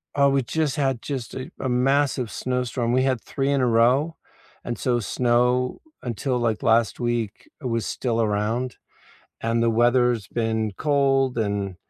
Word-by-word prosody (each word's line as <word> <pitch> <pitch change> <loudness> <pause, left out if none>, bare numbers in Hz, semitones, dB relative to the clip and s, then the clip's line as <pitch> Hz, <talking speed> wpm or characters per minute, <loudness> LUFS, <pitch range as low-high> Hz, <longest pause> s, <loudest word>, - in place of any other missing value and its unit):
Oh, 140 -1 +4
we 135 0 +2
just 150 +3 -1
had 135 -4 0
just 130 -5 -4
a 130 - -6
a 130 - -2
massive 130 -1 +1
snowstorm, 125 -1 -2
we 130 +1 +3
had 130 -4 0
3 135 0 -2
in 140 -1 +2
a 125 - +3
row, 125 +8 +3 0.5
and 120 - -4
so 120 -2 +1
snow, 125 +3 +1 0.2
until 125 +2 -2
like 115 +1 -1
last 115 -1 +3
week, 120 -3 -2
it 130 - -3
was 115 -1 -1
still 115 -3 -2
around, 110 +4 -1 0.7
and 115 +1 +1
the 115 - +3
weather's 120 -2 +2
been 110 -2 -1
cold 135 -1 +1
and 100 -4 -1
125 Hz, 160 wpm, -24 LUFS, 115-130 Hz, 0.7 s, Oh